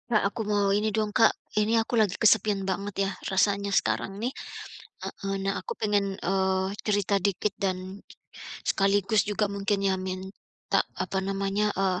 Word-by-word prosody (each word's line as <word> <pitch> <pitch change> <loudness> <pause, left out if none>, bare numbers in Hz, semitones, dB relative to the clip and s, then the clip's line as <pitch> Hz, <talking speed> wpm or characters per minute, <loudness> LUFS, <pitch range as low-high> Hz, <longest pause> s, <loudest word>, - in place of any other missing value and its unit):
Kak, 215 -3 +3
aku 205 +3 -1
mau 205 -1 +2
ini 210 +2 +2
dong 215 0 -1
Kak, 225 0 +6 0.3
ini 220 +2 +2
aku 225 +2 0
lagi 205 -3 +2
kesepian 210 -2 +3
banget 195 +1 -1
ya, 195 - -2 0.2
rasanya 200 +1 +2
sekarang 120 - 0
ini 245 +4 -2 0.7
heeh. 195 0 -4
Nah 195 0 -1
aku 475 - -6
pengen, 205 -2 +1
eee, 190 0 +1 0.2
cerita 205 -1 +2
dikit 200 +2 0
dan, 185 0 -3 0.7
sekaligus 200 +1 +3
juga 210 0 0
mungkin 200 0 -1
ya 195 -1 +3
minta 185 +1 -3 0.2
apa 195 - -1
namanya, 195 +2 0
eee, 190 -2 +1
200 Hz, 155 wpm, -27 LUFS, 195-210 Hz, 0.7 s, Kak